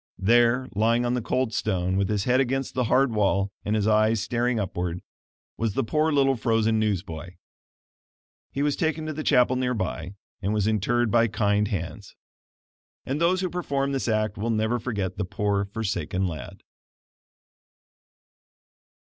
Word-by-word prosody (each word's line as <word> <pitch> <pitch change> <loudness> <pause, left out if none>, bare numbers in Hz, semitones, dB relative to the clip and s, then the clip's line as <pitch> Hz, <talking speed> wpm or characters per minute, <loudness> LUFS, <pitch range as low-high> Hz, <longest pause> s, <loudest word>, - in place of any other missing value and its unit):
There, 120 +5 +3
lying 115 +4 +2
on 120 - 0
the 125 - 0
cold 125 0 -1
stone, 95 -4 0
with 95 0 +1
his 105 -2 0
head 125 +3 +2
against 135 0 -1
the 125 -1 0
hard 130 +1 +3
wall, 100 -2 +1
and 105 - 0
his 105 -2 +1
eyes 110 +1 +3
staring 120 +3 0
upward, 90 -3 -3 0.5
was 115 -3 -1
the - - +1
poor 155 +7 +1
little 135 -2 +3
frozen 115 -1 +1
newsboy. 90 -4 -3 1.2
He 140 - -1
was 145 -1 +1
taken 160 -1 -1
to 155 - -3
the 155 - -4
chapel 125 -3 +3
near 125 -1 0
by, 95 -2 -4 0.3
and 100 +2 -1
was 105 -2 +1
interred 110 +2 +1
by 115 -1 +4
kind 105 -1 +1
hands. 90 -5 -5 0.9
And 140 +4 -2
those 180 +2 +3
who 185 - -1
performed 140 -6 -1
this 135 - -2
act 110 -2 0
will 115 +3 -1
never 110 +2 +1
forget 100 -6 -3
the - - +1
poor 100 +1 -1
forsaken 95 -3 -2
lad. 80 -6 -6
110 Hz, 160 wpm, -25 LUFS, 100-125 Hz, 1.2 s, by